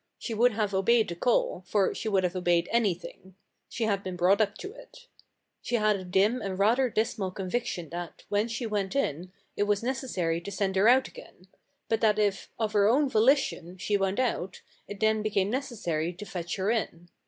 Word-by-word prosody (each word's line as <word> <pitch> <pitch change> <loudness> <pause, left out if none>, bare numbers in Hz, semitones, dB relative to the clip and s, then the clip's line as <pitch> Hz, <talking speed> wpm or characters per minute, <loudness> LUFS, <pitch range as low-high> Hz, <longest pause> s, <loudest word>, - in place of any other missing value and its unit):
She 230 - -5
would 235 +2 +3
have 210 -2 -1
obeyed 220 +3 +3
the 170 - -4
call, 190 -2 +1
for 200 -3 +2
she 220 - -3
would 195 -2 +2
have 180 0 -1
obeyed 175 -2 +1
anything. 190 -4 -2 0.3
She 235 - -3
had 200 -3 +1
been 185 -2 -5
brought 185 +4 +3
up 205 -1 0
to 395 - -7
it. - - -15 0.6
She 245 - -2
had 215 -2 +3
a 190 - -5
dim 200 +7 +2
and 190 -2 -4
rather 235 +6 +3
dismal 215 -3 -1
conviction 185 -3 -3
that, 175 0 -7
when 205 +2 +1
she 235 +1 -4
went 205 -2 -2
in, 180 - -1 0.2
it 205 - +1
was 205 +1 0
necessary 210 -11 -1
to 185 - -7
send 195 0 -1
her 195 +3 +4
out 260 +2 +5
again; 180 - -14 0.4
but 225 - 0
that 215 -2 +3
if, 205 -2 0
of 220 -2 -1
her 205 -1 +4
own 275 +4 +3
volition, 220 - +2
she 205 +3 -1
went 195 +1 0
out, 210 -7 -2 0.2
it 205 - -8
then 220 0 +2
became 205 -2 0
necessary 190 - -2
to 185 +4 -9
fetch 175 -2 -4
her 195 +2 0
in. 175 -7 -3
205 Hz, 200 wpm, -28 LUFS, 185-225 Hz, 0.6 s, out